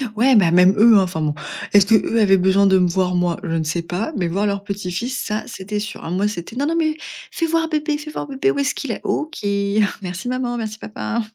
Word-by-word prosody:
Ouais, 250 +3 +4
bah, 185 -6 +5
même 180 +2 +6
eux, 220 0 +7
hein, 195 - +5
enfin, 175 -3 -3
bon. 150 -1 -1 0.4
Est-ce 200 -1 +7
qu'eux 225 +1 +2
avaient 195 -2 +5
besoin 190 +2 +3
de 190 -1 +5
me 180 - +3
voir, 180 +1 0
moi? 175 -1 0
Je - - -5
ne 160 - 0
sais 165 +2 -2
pas, 180 - -3
mais 175 -3 0
voir 195 +5 -1
leur 200 0 -2
petit-fils, 200 +5 -4
ça, 215 0 -3
c'était 210 -2 -5
sûr, 215 +2 -7
hein, - - -6
moi, 195 +3 +1
c'était: 210 +2 -6
«Non, 285 - 0
non, 330 - 0
mais 315 -2 0 0.3
fais 330 - -1
voir 325 0 0
bébé, 305 -1 -1
fais 305 0 -9
voir - - -5
bébé, 280 +9 0
où - - -4
est-ce 275 - +1
qu'il - - -5
est?» - - -5
OK, 315 +2 -2 0.6
merci 185 +4 -6
maman, 250 -1 -2
merci 215 -1 -5
papa. 230 +2 -4
210 Hz, 250 wpm, -20 LUFS, 180-255 Hz, 0.6 s, eux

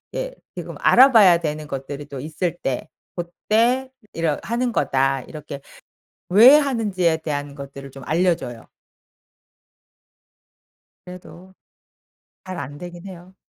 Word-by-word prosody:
예 - - -4 0.2
지금 - - -7
알아봐야 220 -10 +6
되는 155 -2 -4
것들이 140 +1 -6
또 140 -3 -8
있을 160 +4 -3
때 135 +3 -2 0.3
고때 230 +9 0 0.2
"이러 165 -3 -1
하는 240 +2 -1
거다." 135 - +1
이렇게 150 -2 -9 0.7
왜 230 +10 +8
하는지에 205 - 0
대한 145 -3 -4
것들을 140 -1 -9
좀 135 0 -12
알려 175 +2 +2
줘요. 120 -3 -9 2.4
그래도 180 +1 -13 0.9
잘 185 -1 -7
안 145 +1 -7
되긴 175 +1 -9
해요. 185 0 -12
170 Hz, 225 characters per minute, -22 LUFS, 145-195 Hz, 2.4 s, 왜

